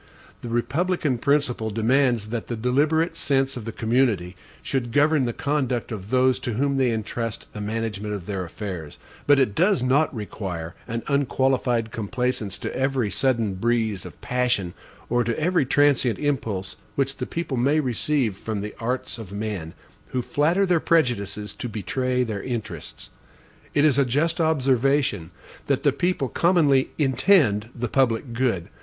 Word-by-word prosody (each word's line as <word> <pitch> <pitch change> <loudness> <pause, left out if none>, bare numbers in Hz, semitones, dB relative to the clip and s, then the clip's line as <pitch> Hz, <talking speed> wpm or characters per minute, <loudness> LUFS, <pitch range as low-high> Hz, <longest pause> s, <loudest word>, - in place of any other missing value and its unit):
The 120 - -6
republican 140 +3 0
principle 135 -5 +1
demands 115 0 +2
that 115 0 -4
the 120 - -3
deliberate 150 +8 +1
sense 135 -3 +1
of 120 -4 -6
the 115 - -4
community 110 -6 +1 0.3
should 125 -3 -2
govern 145 +1 +3
the 120 - 0
conduct 130 -2 -1
of 100 -2 -6
those 130 0 +3
to 120 - -3
whom 140 +4 0
they 130 -2 +3
intrust 115 0 -3
the 105 - -6
management 105 -1 -3
of 95 -4 -7
their 95 -2 -3
affairs; 90 -4 -6 0.3
but 145 0 +6
it 130 -7 +2
does 180 - +2
not 140 +5 +3
require 95 - -5
an 115 +1 -3
unqualified 130 -4 +1
complaisance 115 -2 -2
to - - -5
every 130 -5 0
sudden 115 -6 +1
breeze 110 -1 0
of - - -11
passion, 125 -8 0 0.3
or 120 0 +2
to 115 +4 -2
every 170 -3 +2
transient 135 -5 +3
impulse 115 -10 -2 0.2
which 135 0 -1
the - - -4
people 165 -5 -3
may 140 +6 +2
receive 130 -4 0
from 105 +1 -4
the 105 +1 -5
arts 120 0 -3
of 105 -4 -9
men, 100 -5 -4 0.3
who 125 -1 -2
flatter 165 +10 +2
their 180 -3 +3
prejudices 105 - 0
to 120 +3 -5
betray 125 +4 -1
their 110 -4 -3
interests. 120 -4 -6 0.6
It 145 - +4
is 140 -3 +4
a 140 - +4
just 155 +7 +1
observation, 135 - +2 0.4
that - - +1
the - - +4
people 175 -6 0
commonly 150 -5 +3
INTEND 130 - +3
the 120 0 -2
PUBLIC 120 -1 +1
GOOD. 115 -8 0
125 Hz, 160 wpm, -24 LUFS, 110-140 Hz, 0.6 s, but